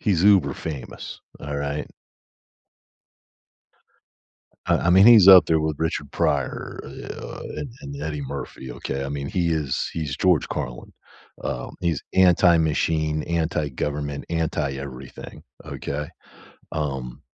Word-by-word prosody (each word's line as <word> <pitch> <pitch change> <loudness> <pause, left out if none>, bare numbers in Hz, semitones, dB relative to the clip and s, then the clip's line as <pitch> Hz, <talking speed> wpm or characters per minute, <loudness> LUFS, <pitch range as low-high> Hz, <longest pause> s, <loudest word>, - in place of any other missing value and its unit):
He's 95 -5 +1
uber 95 -9 +5
famous, 70 -1 -7 0.2
alright? 70 0 -3 2.8
I - - +3
I 85 - +1
mean, 95 +3 +7
he's 110 -5 +9
up 95 -2 +10
there 80 -1 +2
with 80 -1 -1
Richard 80 -3 -2
Pryor, 70 -3 -1
eh, - - -9
uh, - - -7
and 135 - -5
and 70 0 -7
Eddie 75 -1 -3
Murphy, 70 -2 -6
okay? 70 +2 -4
I - - -4
mean, 70 0 -4
he 90 -3 0
is 75 -5 -1
he's 75 -4 -3
George 90 -5 +2
Carlin, - - -5 0.5
um, 60 - -4
he's 85 -4 -1
anti-machine, 80 -4 +3
anti-government, 75 -3 -2
anti-everything, 70 -5 -4 0.2
okay? 75 +1 -5 0.6
Um, 65 -4 -4
75 Hz, 115 wpm, -24 LUFS, 70-85 Hz, 2.8 s, up